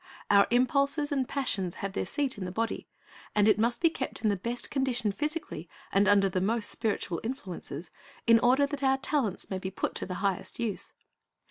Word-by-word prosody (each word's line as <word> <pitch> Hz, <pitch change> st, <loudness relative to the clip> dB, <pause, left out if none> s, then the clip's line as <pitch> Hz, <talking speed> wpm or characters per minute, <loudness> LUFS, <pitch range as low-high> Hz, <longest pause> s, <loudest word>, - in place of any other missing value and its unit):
Our 200 Hz, 0 st, +6 dB
impulses 280 Hz, +4 st, +2 dB
and 270 Hz, -3 st, 0 dB
passions 195 Hz, -10 st, 0 dB
have 195 Hz, -1 st, -4 dB
their -, -, -2 dB
seat 280 Hz, -3 st, -1 dB
in 185 Hz, -, -4 dB
the 180 Hz, -, -4 dB
body, 225 Hz, +4 st, -2 dB, 0.5 s
and 210 Hz, 0 st, +4 dB
it 215 Hz, -, +4 dB
must 235 Hz, +2 st, +1 dB
be 330 Hz, -2 st, +4 dB
kept 265 Hz, -6 st, -4 dB
in 215 Hz, -, +3 dB
the 205 Hz, -, +2 dB
best 235 Hz, +6 st, -4 dB
condition 255 Hz, -6 st, +1 dB
physically, 295 Hz, -, -4 dB, 0.2 s
and 200 Hz, +1 st, +3 dB
under 200 Hz, -1 st, +5 dB
the 185 Hz, -1 st, -1 dB
most 220 Hz, +3 st, +1 dB
spiritual 205 Hz, -6 st, -1 dB
influences, 185 Hz, -, -5 dB, 0.3 s
in 230 Hz, -1 st, +6 dB
order 255 Hz, +4 st, +4 dB
that 285 Hz, 0 st, -5 dB
our 265 Hz, -1 st, +3 dB
talents 265 Hz, -10 st, -1 dB
may 190 Hz, -, -2 dB
be 190 Hz, -, -4 dB
put 190 Hz, -, -3 dB
to -, -, -3 dB
the 180 Hz, -, -4 dB
highest 195 Hz, +3 st, -1 dB
use. 230 Hz, -4 st, -3 dB
230 Hz, 200 wpm, -29 LUFS, 195-265 Hz, 0.5 s, Our